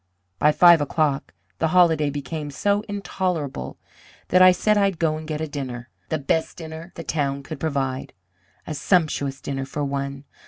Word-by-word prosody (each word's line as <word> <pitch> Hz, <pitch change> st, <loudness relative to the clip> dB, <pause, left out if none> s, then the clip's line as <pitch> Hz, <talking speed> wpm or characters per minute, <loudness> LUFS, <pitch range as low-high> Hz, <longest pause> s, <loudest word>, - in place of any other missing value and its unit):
"By 150 Hz, -, +5 dB
five 170 Hz, 0 st, +7 dB
o'clock 145 Hz, -1 st, 0 dB, 0.3 s
the -, -, +2 dB
holiday 160 Hz, -3 st, +4 dB
became 145 Hz, +2 st, -5 dB
so 200 Hz, +8 st, +1 dB
intolerable 180 Hz, -, -3 dB, 0.5 s
that 185 Hz, -, +5 dB
I 185 Hz, 0 st, +9 dB
said 210 Hz, +4 st, +2 dB
I'd 200 Hz, -3 st, +2 dB
go 160 Hz, -2 st, +1 dB
and 155 Hz, 0 st, -7 dB
get 155 Hz, -1 st, -3 dB
a 160 Hz, -, -2 dB
dinner. 130 Hz, -4 st, -6 dB, 0.2 s
The 160 Hz, -, 0 dB
best 160 Hz, +3 st, -1 dB
dinner 160 Hz, +1 st, -8 dB
the 165 Hz, -, -6 dB
town 140 Hz, -2 st, -1 dB
could 155 Hz, +1 st, -7 dB
provide. 135 Hz, -4 st, -2 dB, 0.5 s
A -, -, -4 dB
sumptuous 150 Hz, -5 st, +1 dB
dinner 135 Hz, -1 st, -4 dB
for 145 Hz, +1 st, -3 dB
one. 140 Hz, 0 st, -3 dB
155 Hz, 165 wpm, -23 LUFS, 140-170 Hz, 0.5 s, I